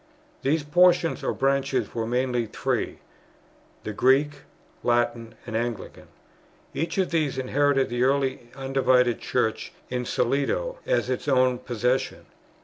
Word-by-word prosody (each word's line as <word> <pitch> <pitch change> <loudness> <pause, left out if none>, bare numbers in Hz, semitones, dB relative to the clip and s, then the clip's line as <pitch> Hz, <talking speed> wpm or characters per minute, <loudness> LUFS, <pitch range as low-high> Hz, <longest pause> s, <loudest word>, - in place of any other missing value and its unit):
These 150 +3 +1
portions 175 +2 +3
or - - 0
branches 135 -3 0
were 115 -1 -2
mainly 125 -1 0
three: - - -2 0.9
the 110 - -4
Greek, 140 +6 +3 0.4
Latin, 120 -1 0
and 115 - -6
Anglican. 115 -2 -4 0.7
Each 165 +5 -3
of 190 -2 +1
these 155 -5 0
inherited 135 +1 +1
the 120 0 -2
early 130 -2 +1
undivided 130 -2 +2
Church 110 -3 -1 0.2
in 125 -1 -2
solido 145 - 0
as - - +1
its 130 +3 -3
own 130 -2 +3
possession. 125 +1 -1
130 Hz, 125 wpm, -25 LUFS, 120-140 Hz, 0.9 s, portions